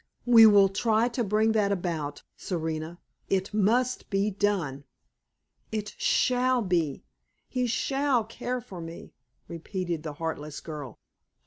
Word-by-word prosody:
We 230 -2 +9
will 200 -2 +7
try 220 +4 +1
to 240 0 -2
bring 215 +2 +2
that 210 -2 +2
about, 165 -6 -3
Serena. 160 -1 -4 0.3
It 190 +1 0
must 235 +5 +1
be 200 +1 +1
done!" 185 -9 -1 0.9
"It 210 -1 -4
shall 250 -1 +2
be! 170 -7 0 0.4
He 250 -1 -1
shall 270 +1 +1
care 245 +3 -4
for 190 -7 -9
me!" 165 0 -9 0.3
repeated 170 0 -4
the 155 -2 -6
heartless 150 -1 -5
girl. 150 -6 -8
200 Hz, 125 wpm, -27 LUFS, 165-225 Hz, 0.9 s, We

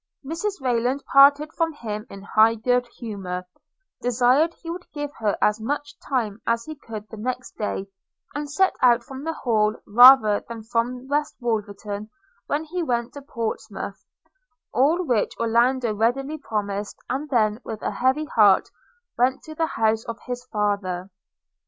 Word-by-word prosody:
Mrs 335 +7 -3
Rayland 255 +1 0
parted 285 +2 +6
from 330 -1 0
him 215 -5 -6
in 195 0 -10
high 220 +2 +4
good 245 +2 +1
humour, 190 -6 -5 0.6
desired 250 +7 +3
he 335 - -7
would 350 +1 -8
give 290 -1 -4
her 210 -3 0
as 210 +1 +2
much 290 +4 -3
time 225 -6 -2
as 230 0 +1
he 310 - -6
could 220 -7 -9
the 220 - -9
next 255 +3 -4
day, 205 -2 -3 0.5
and 295 0 -4
set 375 +7 +2
out 240 -1 +5
from 265 +2 -9
the 325 +1 -2
Hall 215 -6 +1
rather 235 -2 +7
than 230 -1 -7
from 245 +3 -2
West 295 +2 -1
Wolverton 210 -3 -3 0.4
when 295 +2 -1
he 350 +3 -4
went 240 -6 -1
to 285 - -8
Portsmouth; 235 -5 -5 0.7
all 310 +8 +3
which 235 -7 0
Orlando 235 +1 +2
readily 270 +8 0
promised, 205 -4 -3
and 280 +4 -3
then, 220 -3 +1
with 220 -1 -7
a - - -1
heavy 260 +5 +1
heart, 210 -9 +4 0.5
went 255 +2 +2
to 315 - -9
the 325 +1 0
house 220 -3 +1
of 230 -1 -5
his 245 0 -5
father. 200 -4 -2
245 Hz, 160 wpm, -24 LUFS, 215-280 Hz, 0.7 s, rather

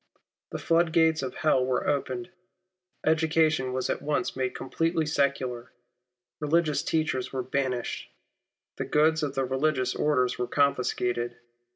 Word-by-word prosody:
The - - -4
flood 165 -1 +2
gates 160 -2 +4
of 130 -2 -4
hell 150 -5 +2
were 130 0 0
opened. 180 +6 -2 0.7
Education 160 -3 +2
was 130 0 -1
at - - -2
once 150 0 -1
made 130 -1 -2
completely 165 +4 -1
secular. 130 -5 -1 0.7
Religious 155 0 +1
teachers 155 -5 -1
were 130 -1 -2
banished. 130 -2 -2 0.7
The - - -2
goods 160 +1 +3
of 145 -2 -2
the 135 0 +1
religious 130 -1 0
orders 125 -5 +1
were 125 - -1
confiscated. 125 -4 0
140 Hz, 135 wpm, -27 LUFS, 130-155 Hz, 0.7 s, gates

